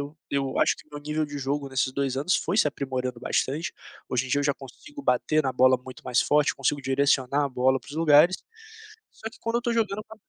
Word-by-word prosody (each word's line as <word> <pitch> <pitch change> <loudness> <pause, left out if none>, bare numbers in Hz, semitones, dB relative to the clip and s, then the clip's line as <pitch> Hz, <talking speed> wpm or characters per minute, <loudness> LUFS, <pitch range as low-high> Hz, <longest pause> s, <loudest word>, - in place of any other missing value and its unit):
eu 145 +2 -7
eu 135 -1 -1
acho - - +3
que - - -17
meu 145 0 -8
nível 150 +1 -2
de 145 0 -6
jogo 140 +1 -2
nesses 130 0 -1
2 135 -1 -1
anos 150 +7 +1
foi 180 +5 -2
se 185 - +4
aprimorando 130 -3 -4
bastante, 145 +5 -1 0.4
hoje 125 +1 -1
em - - -9
dia 145 - +2
eu - - -2
já 140 - +3
consigo 285 - -12
bater 155 - +2
na 130 - 0
bola 130 +1 +4
muito 130 0 -12
mais 125 -1 +2
forte, 150 0 +3
consigo 140 +1 -1
direcionar 135 +1 +2
a 140 - -1
bola 130 +1 +2
para - - -18
os - - -8
lugares, 160 +3 +5 0.8
só 225 - -8
que - - -19
quando 230 +1 -2
eu - - +1
estou 240 -1 -1
jogando, 215 -4 0
eu 215 - -8
fa 220 - -12
140 Hz, 245 wpm, -26 LUFS, 130-155 Hz, 0.8 s, lugares